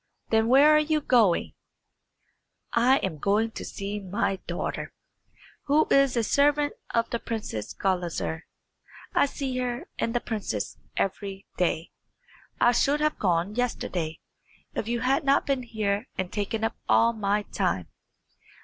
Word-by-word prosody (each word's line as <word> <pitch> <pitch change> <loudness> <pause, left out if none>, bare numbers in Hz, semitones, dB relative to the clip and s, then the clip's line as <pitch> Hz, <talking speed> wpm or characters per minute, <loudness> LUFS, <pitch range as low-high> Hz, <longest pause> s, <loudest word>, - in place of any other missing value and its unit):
"Then 220 0 +3
where 285 +5 +7
are - - +6
you 305 0 +1
going?" 235 - +3 1.2
"I 250 +3 +5
am 160 -6 -2
going 210 +6 +1
to - - -7
see 200 +1 -5
my 195 0 -1
daughter, - - -3 0.7
who 300 +2 +4
is 275 -3 +4
a 230 - +2
servant 290 +4 +3 0.2
of 230 -1 0
the 235 - -1
Princess 210 - -4
Gulizar. 175 -3 -2 0.7
I - - +4
see 270 -2 -4
her 250 +7 -3
and 230 - -1
the - - +3
princess 200 - -4 0.2
every 195 0 -2
day. 170 -2 0 0.7
I 240 - +5
should 280 +4 +2
have 305 0 0
gone 180 +1 +1
yesterday, 185 -9 -2 0.5
if 215 - -3
you 235 0 -1
had 270 +5 +2
not 275 0 +3
been 275 -2 0
here 215 -2 -2
and 185 -1 -3
taken 215 +1 -2
up 225 - 0
all 230 +1 +5
my 210 -1 0
time." 180 - -1
225 Hz, 145 wpm, -27 LUFS, 195-260 Hz, 1.2 s, where